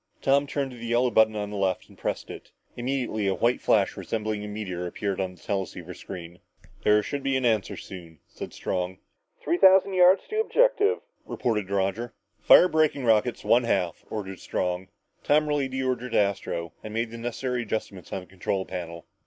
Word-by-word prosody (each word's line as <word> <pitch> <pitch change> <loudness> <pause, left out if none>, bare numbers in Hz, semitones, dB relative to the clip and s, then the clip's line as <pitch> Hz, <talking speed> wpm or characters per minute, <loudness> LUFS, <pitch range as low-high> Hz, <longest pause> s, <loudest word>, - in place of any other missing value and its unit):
Tom 140 +1 +3
turned 140 -1 -2
to 125 - -10
the 120 0 -7
yellow 120 +1 +2
button 110 -1 +4
on 105 -1 -3
his 105 - -4
left 95 -2 0
and - - -18
pressed - - -4
it. - - -10 0.3
Immediately 120 -4 -1
a 95 - +1
white 120 +2 +1
flash - - +2
resembling 110 -1 -3
a - - -5
meteor 95 -4 -4
appeared 100 +1 -3
on 90 -1 -3
the - - -22
teleceiver 90 -2 -4
screen. 90 -1 -9 0.4
"There 105 0 +4
should 145 +4 -4
be 135 -1 +1
an 130 - -1
answer 110 -4 +1
soon," 85 -4 -10
said - - -8
Strong. 90 0 -3 0.5
"Three 175 - +1
thousand 190 +1 +6
yards 185 +1 +6
to 430 - 0
objective," 455 -2 +3 0.2
reported 105 -5 -2
Roger. 100 +4 -1 0.3
"Fire 180 - +7
braking 155 -5 +1
rockets 115 +1 +2
one 120 +1 +4
half," 90 -7 0
ordered 95 -3 -5
Strong. 90 +1 -2 0.4
Tom 150 +1 +3
relayed 145 -2 0
the 130 0 -2
order 125 -1 -1
to - - 0
Astro 95 -4 -1
and 110 0 -7
made 115 0 -1
the 115 - -8
necessary 120 +1 -2
adjustments 105 -5 -5
on 95 - -3
the - - -13
control 95 +1 -3
panel. 85 -2 -6
110 Hz, 190 wpm, -26 LUFS, 95-130 Hz, 0.5 s, Fire